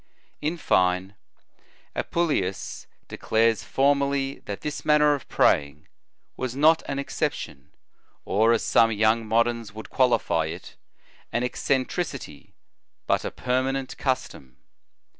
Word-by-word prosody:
In 155 +4 -1
fine, 90 - +1 0.8
Apuleius 145 - -2 0.2
declares 115 0 +1
formally, 140 0 +1
that 100 - -6
this 150 - -4
manner 150 -1 +4
of 140 - -6
praying 75 +1 +1 0.5
was 130 -1 -4
not 160 +3 +5
an 140 - -3
exception, 70 - -4 0.6
or, 110 +4 +3
as 115 - +2
some 115 0 +4
young 110 +1 +2
moderns 115 0 0
would 110 - -9
qualify 100 -11 +2
it, 85 +3 -8 0.6
an 120 - 0
eccentricity, 130 - -3 0.5
but - - +1
a - - -2
permanent 130 +1 -2
custom. 70 - -3
120 Hz, 110 wpm, -25 LUFS, 100-140 Hz, 0.8 s, not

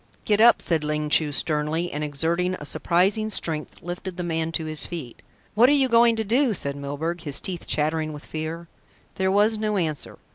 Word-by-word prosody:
"Get 210 0 +2
up," 235 +1 +6
said 160 -3 +1
Ling 150 0 -2
Chu 150 0 +4
sternly, 155 +3 -1
and, 150 +1 -3
exerting 165 +5 -1
a 150 - -9
surprising 195 +8 +1
strength, 160 -6 -4
lifted 175 +1 -6
the 180 - -3
man 165 -1 -2
to 160 - -1
his 155 -1 -1
feet. 155 -9 -8 0.3
"What 235 +4 +5
are - - +5
you 275 -2 +3
going 235 -1 +5
to 220 - -1
do?" 235 +2 +2
said 140 -4 -3
Milburgh, 145 +5 -4
his 145 -4 -1
teeth 180 -3 -4
chattering 155 +1 0
with 150 -1 -9
fear. 160 +2 -5 0.5
There 190 0 +1
was 210 +2 +3
no 215 -1 0
answer. 155 -6 -2
170 Hz, 195 wpm, -24 LUFS, 150-205 Hz, 0.5 s, up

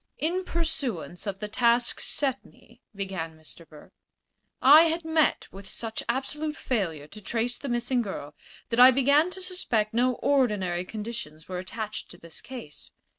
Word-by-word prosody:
"In 350 +5 0
pursuance 265 - -3
of 195 -1 -2
the 210 - -4
task 235 +2 +2
set 270 -3 -1
me," - - -21
began 190 -5 -4
Mr. 160 +1 -13
Burke, 150 -1 -15 0.7
"I 300 +5 +8
had 330 +1 -1
met 320 -1 +2
with 195 0 -10
such 225 -1 -4
absolute 295 +5 -2
failure 180 - -2
to 210 +8 -10
trace 235 +4 -1
the 280 - -5
missing 240 +1 +1
girl 170 -9 -6 0.4
that 235 - 0
I 250 +1 +11
began 280 +5 +4
to 375 +1 -7
suspect 230 - -1
no 250 +2 +3
ordinary 210 -12 +1
conditions 205 -8 -6
were 185 -1 -4
attached 215 +3 -5
to 175 - -11
this 170 -1 -13
case. 240 - -10
235 Hz, 160 wpm, -27 LUFS, 190-275 Hz, 0.7 s, I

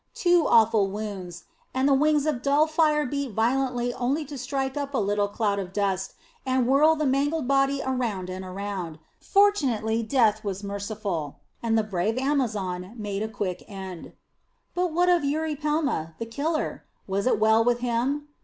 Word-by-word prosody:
Two 350 -3 +3
awful 220 -3 +4
wounds, 190 -4 -6 0.3
and 260 +1 +2
the 280 - +5
wings 300 +1 +3
of 295 -6 -1
dull 285 +3 +3
fire 310 -1 +2
beat 280 -2 -3
violently 245 +2 0
only 275 +6 -1
to 290 +1 -8
strike 265 0 -3
up 285 -1 -3
a - - +2
little 205 -1 +1
cloud 205 -1 -1
of 185 -2 -5
dust 195 -2 -1 0.3
and 260 -1 +1
whirl 300 +5 +5
the 305 -1 -1
mangled 280 +1 +1
body 275 0 +2
around 235 -8 -2
and 185 +1 -6
around. 185 -3 -5 0.2
Fortunately 260 - +2
Death 220 -3 +2
was 200 -1 -4
merciful, 200 -6 -4 0.3
and 225 -1 +1
the 220 - +2
brave 210 +2 -1
amazon 215 -8 -1
made 205 -2 -3
a 220 - -1
quick 200 -4 -4
end. 190 -4 -8 0.6
But 355 -1 0
what 350 +3 +2
of 350 -1 +4
Eurypelma, 295 - -1
the 230 - -4
killer? 295 +8 -2 0.2
Was 200 +4 -1
it 235 - +2
well 220 +1 +4
with 240 0 +1
him? 250 +5 -1
240 Hz, 165 wpm, -26 LUFS, 205-280 Hz, 0.6 s, the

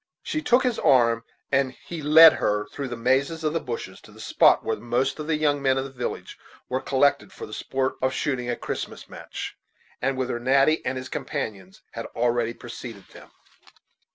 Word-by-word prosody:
She 310 - -2
took 255 -4 +3
his 250 -3 0
arm, 115 -3 +3 0.3
and 135 -1 +2
he 170 -2 -8
led 155 +2 +9
her 105 0 0
through 140 +4 -5
the 120 -2 -6
mazes 135 +7 +1
of 155 -1 0
the 165 - +1
bushes 115 -8 -6
to - - -16
the - - -16
spot - - +4
where - - 0
most 125 +4 -1
of 150 - -5
the 160 - +1
young 145 -2 +1
men 135 -1 +2
of 135 - 0
the 135 - -8
village 125 -2 -6 0.3
were 130 +1 -1
collected 140 +1 +1
for - - -8
the 110 - -11
sports 130 +3 -2
of 130 0 +1
shooting 125 -2 -2
a 120 - 0
Christmas - - -6
match, - - -7 0.5
and 135 -1 0
whither 125 -2 -2
Natty 135 +5 +3
and 130 0 -1
his 130 0 -6
Companions 110 - -5
had - - -6
already 120 -1 0
preceded 115 -4 -9
them. - - -14
130 Hz, 195 wpm, -25 LUFS, 120-145 Hz, 0.5 s, led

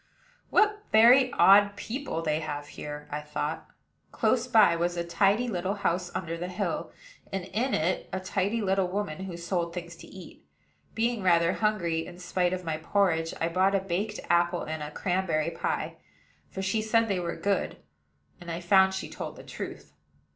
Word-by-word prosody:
"What 420 -1 +3
very 245 +4 +7
odd 200 +1 +6
people 225 - -4
they 155 -1 0
have 145 -2 -5
here!" 150 0 -7
I 150 +1 -3
thought. 150 +1 -4 0.4
Close 240 +2 +1
by 215 -8 +5
was 175 +1 -1
a 170 - 0
tidy 195 +7 +2
little 190 -2 -2
house 180 -3 -1
under 165 -2 -3
the 175 +2 -4
hill, 180 0 -3 0.4
and 195 -2 -3
in 240 +7 -1
it 170 +4 -1
a 190 - -2
tidy 200 +4 -1
little 190 -1 +1
woman 190 -2 -3
who 175 -3 -6
sold 170 0 -2
things 170 -1 -6
to - - -12
eat. 190 -2 -12 0.5
Being 230 0 0
rather 170 -1 +3
hungry, 175 -7 0
in 175 - -11
spite 180 0 0
of 185 -1 -4
my 160 -1 -1
porridge, 165 -1 +1
I 165 - 0
bought 190 +3 +2
a - - +3
baked 195 +3 -3
apple 175 0 +2
and 155 0 -5
a 150 - -4
cranberry 170 -2 -1
pie; 165 - -3 0.5
for 190 - -5
she 195 +3 0
said 225 +1 +2
they 195 -3 0
were 170 -1 -3
good, 200 -1 -1 0.6
and 175 - -10
I 165 0 -3
found 190 +2 +4
she 190 - -4
told - - -7
the - - -12
truth. - - -8
185 Hz, 180 wpm, -28 LUFS, 170-205 Hz, 0.6 s, very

